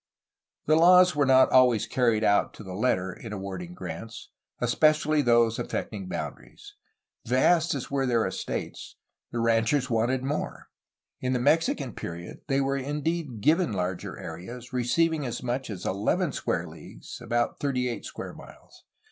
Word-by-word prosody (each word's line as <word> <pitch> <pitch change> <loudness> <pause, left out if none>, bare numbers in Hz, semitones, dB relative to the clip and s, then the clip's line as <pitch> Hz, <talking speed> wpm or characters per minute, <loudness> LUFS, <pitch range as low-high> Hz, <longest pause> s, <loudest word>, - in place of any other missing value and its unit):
The 155 - +4
laws 180 +1 +6
were 145 -2 +2
not 130 0 +6
always 125 -4 +5
carried 115 -4 +1
out 100 -1 +2
to - - -10
the 95 -2 -8
letter 95 -3 0
in 110 +4 -10
awarding 100 - -6
grants, 115 -9 -8 0.3
especially 155 +5 +3
those 120 -3 +3
affecting 100 -4 -4
boundaries. 410 - -7 0.5
Vast 160 +7 +3
as 135 - -6
were 135 -1 0
their 120 -2 +2
estates, - - -5 0.4
the 120 - -3
ranchers 115 +4 +2
wanted 120 +3 +1
more. 145 +3 -4 0.5
In 130 0 -1
the 125 - +1
Mexi 155 +6 +3
can 135 -7 -6
period 85 +1 -7
they 135 -1 +1
were 135 0 0
indeed 145 -2 -3
given 160 - +3
larger 90 -1 -3
areas, 120 +10 -8
receiving 155 +6 +1
as 125 -1 -4
much 125 +1 -2
as 95 -4 -6
eleven 100 +3 0
square - - -2
leagues - - -11
(about 120 0 -1
thirty 130 -3 0
eight 120 - -4
square - - -7
miles). - - -15
125 Hz, 155 wpm, -27 LUFS, 115-145 Hz, 0.5 s, laws